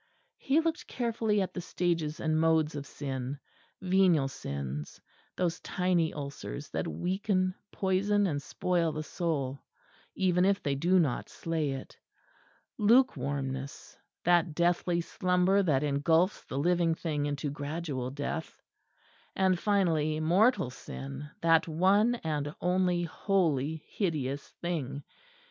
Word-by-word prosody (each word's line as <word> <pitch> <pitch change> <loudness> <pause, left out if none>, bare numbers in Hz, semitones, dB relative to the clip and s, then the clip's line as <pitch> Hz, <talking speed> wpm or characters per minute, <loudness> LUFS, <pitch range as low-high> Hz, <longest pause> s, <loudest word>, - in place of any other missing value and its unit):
He 285 +4 +2
looked 330 0 -2
carefully 225 -4 0
at 185 - -5
the 180 - -4
stages 170 -3 -1
and 155 -1 +1
modes 160 -1 +3
of 145 -1 -6
sin 135 -1 -4 0.5
venial 180 -6 +4
sins, 70 - -5 0.4
those 175 -2 0
tiny 180 -3 +1
ulcers 140 - -6
that - - -2
weaken, 185 - 0 0.2
poison 200 +2 +1
and 145 -6 -1
spoil 170 +1 0
the 155 - -3
soul, 140 -5 -2 0.5
even 180 -2 +2
if 195 +1 +2
they 140 - +1
do 175 +7 +3
not 150 -9 +1
slay 160 -4 -2
it 135 - -9 0.8
lukewarmness, 140 - +1 0.3
that 175 -2 +3
deathly 175 0 +2
slumber 180 +3 +2
that 150 -7 +2
engulfs 160 +6 +2
the - - -5
living 170 +2 +2
thing 150 -3 -2
into 145 0 -2
gradual 145 -3 -4
death 145 +4 -5 0.8
and, 185 -2 +2
finally, 165 -7 +1
mortal 175 - +3
sin, 140 +3 -8
that 165 0 +4
one 195 +8 +3
and 150 -2 -2
only 180 -1 +1
wholly 160 -5 0
hideous 145 -8 -2 0.2
thing. 145 -5 -3
165 Hz, 120 wpm, -30 LUFS, 145-185 Hz, 0.8 s, venial